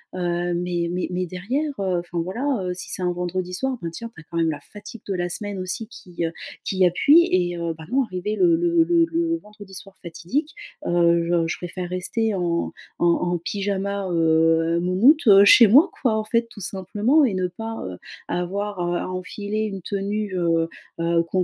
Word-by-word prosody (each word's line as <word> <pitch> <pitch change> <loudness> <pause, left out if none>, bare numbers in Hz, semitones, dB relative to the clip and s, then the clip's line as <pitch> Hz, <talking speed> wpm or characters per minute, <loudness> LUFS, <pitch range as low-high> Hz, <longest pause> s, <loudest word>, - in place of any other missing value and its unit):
Heu, 175 -1 -1
mais 175 -1 -1
mais 180 +1 -2
mais 180 +1 -1
derrière, 235 - -2
heu, 185 -3 0
enfin, 175 0 -5
voilà, 190 +10 -4 0.2
heu, 180 0 -2
si 180 - -8
c'est - - -3
un 180 -1 +1
vendredi 180 +1 -3
soir, 265 +7 -2
ben 170 - -3
tiens 230 +7 -7
tu - - -14
as - - -16
quand 170 - -9
même 165 -1 +2
la 150 - -6
fatigue 205 +7 -11
de 200 - -1
la 175 -1 -2
semaine 205 +2 -4
aussi 190 +4 -4
qui, 175 -6 -6
heu, 165 - -2 0.3
qui 190 -1 +2
appuie 290 - +5
et 175 -1 +1
heu, 170 -1 -2
bah, 160 - -10
moi, 265 +3 +2
arrivé 185 +3 -3
le 340 +5 +4
le 340 -1 +3
le 335 0 +3
le 330 0 -1
vendredi 210 -5 -14
soir 195 +1 -11
fatidique, 180 - -3 0.3
heu, 170 -1 +3
je 170 -1 +1
je 165 - -3
préfère 180 0 -6
rester 205 +4 -1
en 170 -2 -1 0.3
en 175 - +3
en 175 +1 +1
pyjama, 200 +2 -2
heu, 165 0 +3
moumoute, 235 - +4
heu, 200 -1 +8
chez 225 +2 +8
moi, 290 - +6
quoi, 240 -5 +2
en 215 - -1
fait, 230 +2 +1
tout 205 - -12
simplement, 205 - +1
et 230 - 0
ne 185 -1 0
pas, 225 +5 -6
heu, 90 - -7 0.3
avoir 195 +3 -3
à - - -1
à 175 0 -1
enfiler 205 +3 -4
une 195 -4 -6
tenue, 200 +1 -3
heu, 175 -2 0 0.5
heu, 170 0 +2
con 180 +2 0
185 Hz, 205 wpm, -23 LUFS, 175-215 Hz, 0.5 s, heu